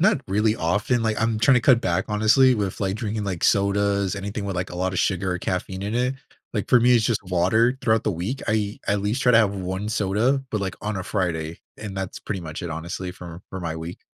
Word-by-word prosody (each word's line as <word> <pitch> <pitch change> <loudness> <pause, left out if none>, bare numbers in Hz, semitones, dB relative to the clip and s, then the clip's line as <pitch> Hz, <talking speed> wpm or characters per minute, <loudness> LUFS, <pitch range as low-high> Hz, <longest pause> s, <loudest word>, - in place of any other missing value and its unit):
not 195 -4 +3
really 105 +2 +2
often, 105 +8 0
like, 110 -1 0
I'm 115 -1 +1
tryna 125 +2 +4
cut 125 -4 +5
back 85 -2 0
honestly 110 +5 +4
with, 100 -4 -2
like, 95 -1 0
drinking, 110 -2 -3
like, 90 -4 -3
sodas, 100 -1 +2
anything 100 +2 -4
with, 100 -2 -3
like, 90 +1 -3
a 90 - -7
lotta 95 +1 -1
sugar 95 0 0
or 90 - -3
caffeine 95 +1 -3
in 105 +2 -3
it. 125 +2 +1 0.4
Like, 105 -3 -2
for 125 - +6
me, 125 +1 +5
it's 110 - +1
just 115 -1 0
water 110 +8 +2
throughout 110 0 +2
the - - +1
week, 95 +11 -4
I 105 -2 0
I - - +2
at 100 - -1
least 110 +6 -1
try 125 - +4
to 115 - +7
have 105 -3 +3
1 95 +2 -3
soda, 110 +6 +1
but, 105 - -1
like, 95 -2 -3
on 105 -1 -2
a 95 - -3
Friday, 85 -5 -2 0.2
and 100 -2 -7
that's 95 -1 -4
pretty 95 -3 -4
much 80 -1 -6
it 85 - -4
honestly 85 +3 -5
for 85 -1 -10
for 95 - -6
my 80 -2 -3
week. 80 +2 -7
100 Hz, 240 wpm, -24 LUFS, 90-110 Hz, 0.4 s, to